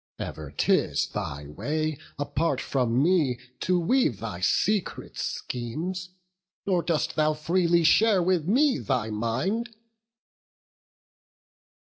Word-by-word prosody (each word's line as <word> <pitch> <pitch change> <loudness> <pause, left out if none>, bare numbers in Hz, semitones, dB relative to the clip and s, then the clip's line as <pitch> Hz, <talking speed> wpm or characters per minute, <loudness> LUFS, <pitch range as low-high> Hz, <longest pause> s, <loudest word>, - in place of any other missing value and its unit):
ever 75 -2 -6
'tis - - +1
thy 70 +1 -5
way 155 - -2 0.2
Apart 145 0 -1
from 125 -1 +1
me 155 -8 +2 0.2
to 180 -1 +1
weave 170 - +2
thy 105 -6 -5
secret 200 - 0
schemes, 165 +10 -4 0.6
Nor 185 -3 +2
dost 165 -2 -1
thou 155 0 +2
freely 170 +2 +2
share 195 +3 +5
with 175 -3 +1
me 265 +6 +3
thy 120 -5 -1
mind." 160 - -2
155 Hz, 105 wpm, -26 LUFS, 125-185 Hz, 0.6 s, share